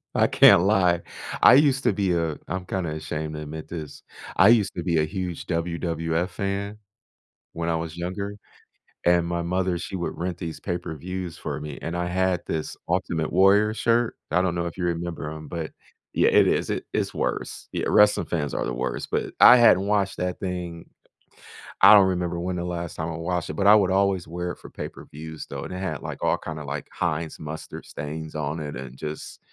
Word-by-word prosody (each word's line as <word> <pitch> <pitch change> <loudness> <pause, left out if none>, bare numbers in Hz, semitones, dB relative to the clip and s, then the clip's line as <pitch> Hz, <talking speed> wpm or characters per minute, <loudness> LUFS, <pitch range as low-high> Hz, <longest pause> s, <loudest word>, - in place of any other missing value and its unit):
I - - +4
can't 85 - +7
lie. 90 -4 +3 0.4
I - - +9
used 135 -1 +4
to - - +4
be 95 -2 +1
uh, 80 -3 -1
I'm 95 +2 -3
kinda 90 -4 -2
ashamed 75 0 -4
to 75 - -5
admit 75 +1 -7
this. 80 -3 -7 0.3
I 95 +3 +7
used 110 -4 +4
to 85 - -3
be 85 -2 +1
a 75 - +3
huge 90 +1 -4
WWF 85 0 -1
fan 100 +2 -3 0.7
when 85 0 -3
I 85 - +1
was 80 0 -5
younger, 95 +4 -4 0.7
and 85 -1 +4
my 85 0 -2
mother, 90 +1 0
she 95 - -5
would 85 - -4
rent 90 0 -2
these 85 -3 -6
pay-per-views 90 0 -5
for - - -4
me 75 -2 -7
and 85 +1 -3
I 90 0 -1
had 95 0 +1
this 80 -1 -3
Ultimate 85 -3 -1
Warrior 100 +3 +5
shirt. 115 0 +1
I 90 +4 +3
don't 90 -2 0
know 85 0 -1
if 85 - -6
you 90 - -3
remember 85 -2 -3
'em, 75 -1 -8
but 80 -2 -4 0.4
Yeah. - - +4
It - - +5
is, - - 0
i - - -1
it's - - -1
worse. - - -3
Yeah, - - -2
wrestling 105 0 +5
fans 75 -4 -2
are - - -1
the 60 - -2
worst, 65 +2 -3
but - - -1
I 125 - +10
hadn't 100 -5 +5
watched 100 -2 +1
that 90 0 -2
thing 90 -3 -5 0.9
I - - +10
don't 100 -2 +7
remember 90 -2 -1
when 90 +1 -2
the 85 - -3
last 85 -2 -4
time 80 - -2
I 85 - -4
watched 85 0 -2
it - - -3
but 100 - -1
I 105 - +9
would 100 -3 +3
always 95 -2 +1
wear 90 +2 -4
it - - -10
for - - -12
pay-per-views, 80 +1 -8
though, - - -5
and - - -7
it - - -4
had, 85 -7 -3
like, - - -7
all - - +2
kinda, 75 -2 -6
like, 70 0 -5
Heinz 80 -2 -2
mustard 80 +1 -7
stains 75 +2 -6
on 75 +1 -2
it 75 -1 -5
and 65 0 -8
just 75 +1 -7
85 Hz, 205 wpm, -25 LUFS, 80-95 Hz, 0.9 s, I